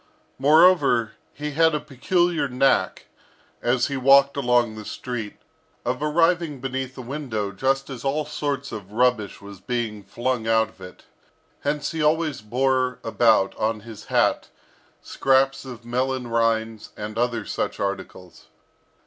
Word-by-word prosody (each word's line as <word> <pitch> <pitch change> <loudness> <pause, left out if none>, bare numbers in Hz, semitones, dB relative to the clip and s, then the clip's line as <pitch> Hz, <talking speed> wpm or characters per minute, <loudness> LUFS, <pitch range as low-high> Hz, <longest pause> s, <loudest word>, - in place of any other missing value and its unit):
Moreover, 145 -6 +5 0.2
he 150 0 -5
had 160 +1 +3
a - - 0
peculiar 170 +4 0
knack, 130 +1 +1 0.6
as 120 +1 +2
he 140 - -3
walked 140 +1 +5
along 120 -4 +2
the 110 0 -8
street, 115 -1 -6 0.5
of 125 +3 -2
arriving 165 -1 +1
beneath 130 0 -4
a 130 - -6
window 120 -6 -4
just 135 +6 0
as 130 -4 -8
all 145 +2 0
sorts 145 -2 -3
of 105 -2 -8
rubbish 120 -3 +1
was 100 -2 -11
being 115 -2 -3
flung 120 +3 -2
out 110 -1 +3
of 105 - -23
it; 90 0 -11 0.6
hence 145 0 -2
he 160 -1 -3
always 155 -3 +1
bore 130 +3 0
about 110 -3 +3
on 110 0 -1
his 115 -1 -11
hat - - +1 0.5
scraps 135 0 +1
of 120 -3 -9
melon 130 +1 -1
rinds, 115 -1 0
and 105 +1 -5
other 120 -3 0
such - - -3
articles. 95 -2 -5
125 Hz, 140 wpm, -23 LUFS, 110-140 Hz, 0.6 s, Moreover